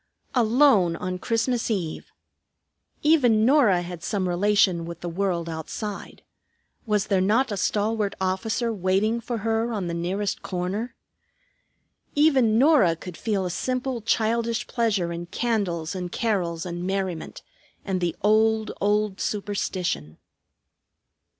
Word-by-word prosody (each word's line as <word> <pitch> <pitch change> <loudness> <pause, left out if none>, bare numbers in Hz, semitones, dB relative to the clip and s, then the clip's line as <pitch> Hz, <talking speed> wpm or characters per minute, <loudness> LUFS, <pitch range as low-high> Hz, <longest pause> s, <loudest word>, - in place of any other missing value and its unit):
Alone 230 - +4
on 180 +1 -4
Christmas 230 +3 0
Eve! 180 -8 -3 0.9
Even 250 -9 +4
Norah 235 -10 +4
had 175 -1 -7
some 190 0 -1
relation 185 -1 +2
with 170 0 -8
the 175 - -4
world 175 -1 -1
outside. 170 +6 -6 0.6
Was 210 -1 +1
there 195 -3 +1
not 225 +6 +2
a - - -1
stalwart 205 +1 0
officer 215 +5 -1
waiting 200 +4 +1
for 235 0 -3
her 225 +1 0
on 205 -5 -2
the 170 - -3
nearest 185 +4 -2
corner? 190 +6 -3 1.2
Even 270 -7 +4
Norah 260 - +5
could 175 +1 -9
feel 200 +1 -1
a 180 - -2
simple 255 +4 -2
childish 230 +2 0
pleasure 200 -8 0
in 170 0 -6
candles 185 -7 -1
and 180 -2 -5
carols 180 -8 -1
and 175 0 -5
merriment, 190 -3 -3 0.4
and 190 -2 -1
the 175 -1 -1
old, 220 +1 +3
old 205 -1 +1
superstition. 185 - -2
205 Hz, 125 wpm, -25 LUFS, 180-225 Hz, 1.2 s, Norah